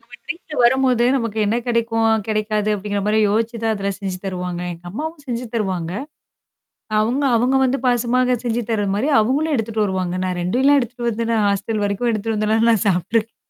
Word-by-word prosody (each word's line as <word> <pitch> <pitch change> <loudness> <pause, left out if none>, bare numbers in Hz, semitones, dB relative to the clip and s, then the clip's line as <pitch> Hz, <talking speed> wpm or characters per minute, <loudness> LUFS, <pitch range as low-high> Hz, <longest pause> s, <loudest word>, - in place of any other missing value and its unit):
அவுங்க - - -17 0.2
வீட்ல 340 -2 -7
வரும்போது 250 -1 +3
நமக்கு 230 -3 -3
என்ன 220 +3 +1
கிடைக்கும், 225 -2 +1
கிடைக்காது 215 0 0
அப்படிங்கிற 205 0 -3
மாரி 215 +1 +2
யோசிச்சு 225 +3 0
தான் 225 - +2
அதில 200 -1 -2
செஞ்சு 190 -3 -4
தருவாங்க. 180 -2 -4
எங்க 170 +1 -13
அம்மாவும் 300 - -6
செஞ்சு 245 0 -3
தருவாங்க. 185 -6 -2 1.1
அவங்க 250 +6 0
அவுங்க 250 +4 +2
வந்து 260 +1 +1
பாசமாக 250 +1 +2
செஞ்சு 240 0 0
தரது 205 -3 0
மாரி 240 +8 0
அவங்களும் 285 +7 +1
எடுத்துட்டு 220 -2 0
வருவாங்க. 185 -2 -2
நான் 180 -1 -2
2லாம் 260 +11 +3
எடுத்துட்டு 240 0 -3
வந்தே 230 0 -2
நான் 215 -2 +2
ஹாஸ்டல் 205 +2 -1
வரைக்கும் 205 +4 0
எடுத்துட்டு 220 0 -2
வந்துல்லா 215 +1 +1
நான் 220 -3 +2
சாப்ட்ருக்கே 215 +5 0
225 Hz, 175 wpm, -20 LUFS, 205-240 Hz, 1.1 s, வரும்போது